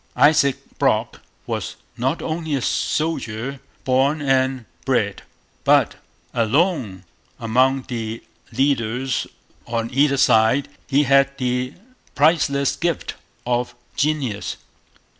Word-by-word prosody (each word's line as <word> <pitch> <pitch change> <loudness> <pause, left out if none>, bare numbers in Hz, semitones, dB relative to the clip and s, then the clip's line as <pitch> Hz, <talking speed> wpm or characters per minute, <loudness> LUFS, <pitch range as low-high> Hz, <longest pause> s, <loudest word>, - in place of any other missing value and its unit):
Isaac 145 -3 +4 0.2
Brock - - +1 0.2
was - - -4 0.2
not 130 +7 -1
only 160 -2 -2
a 135 - -1
soldier 135 -4 -1 0.2
born 135 +4 +2
and 130 -3 +1 0.2
bred, - - 0 0.4
but, - - +4 0.4
alone 120 - +1 0.4
among 130 +4 +2
the 115 -3 -5 0.3
leaders 130 0 0 0.4
on 115 0 -2
either 140 +1 +3
side, 110 +3 +4 0.2
he 145 +1 +3
had 140 0 +3
the 125 +1 -1 0.4
priceless 140 -2 +3
gift 170 -2 -2 0.3
of 120 0 -1 0.2
genius. 140 -8 -1
135 Hz, 100 wpm, -21 LUFS, 120-145 Hz, 0.4 s, Isaac